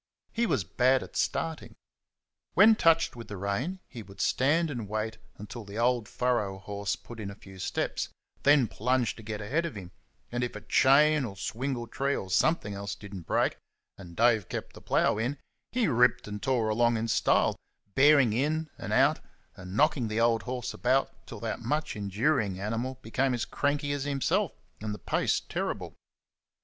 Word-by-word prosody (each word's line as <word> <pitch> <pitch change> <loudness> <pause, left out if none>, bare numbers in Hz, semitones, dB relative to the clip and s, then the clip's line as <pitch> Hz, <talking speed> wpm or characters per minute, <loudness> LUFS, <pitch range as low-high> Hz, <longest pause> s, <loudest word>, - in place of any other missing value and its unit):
He 235 0 +1
was 130 - +1
bad 125 +10 +2
at - - -13
starting. 165 -1 -2 0.8
When 215 +4 +8
touched 165 -7 +3
with 115 -1 -9
the 105 - -6
rein 115 - -2
he 120 - -9
would 100 -1 -14
stand 155 +5 +2
and 115 -7 -5
wait 110 +1 -3 0.2
until 110 +3 -8
the 100 +1 -9
old 120 -2 +1
furrow 120 -6 0
horse 100 +1 -3
put 120 -1 -12
in 100 -2 -4
a 100 - -8
few 95 -2 -14
steps; 90 - -2 0.3
then 140 -4 +5
plunge 125 +3 0
to - - -10
get 105 -1 -5
ahead 145 +11 0
of 170 -7 -4
him, 90 -3 -8 0.4
and 120 +1 -1
if 120 - -3
a 105 - -6
chain 150 +5 +4
or 110 -6 -4
a - - -18
swingle 120 +4 -3
tree 140 +4 -1
or 95 - -5
something 105 - +2
else 100 0 -5
did 100 -1 -11
n't 90 -5 -8
break, - - +1 0.4
and 85 -3 -12
Dave 115 -4 +3
kept - - -5
the - - -13
plough 105 - +2
in, 125 +6 -1 0.3
he 240 -4 +1
ripped 125 -2 +3
and 105 -1 -6
tore 125 -5 +1
along 120 +1 +3
in 110 +1 -2
style, - - +3 0.4
bearing 135 -5 +5
in 155 +5 0
and - - -6
bearing - - -1
out, - - +2 0.4
and 95 +2 -7
knocking 145 -5 +3
the 110 +1 -1
old 115 -1 +3
horse 125 +3 -4
about 135 +1 0
till 115 - -8
that 115 0 -3
much 150 +6 -2
enduring 105 0 0
animal 115 +6 -3
became 130 +3 0
as 120 - -2
cranky 145 0 -1
as 145 -1 -2
himself, 155 +7 +1 0.3
and 105 -1 -3
the - - -8
pace - - 0
terrible. - - -4
120 Hz, 190 wpm, -29 LUFS, 105-140 Hz, 0.8 s, When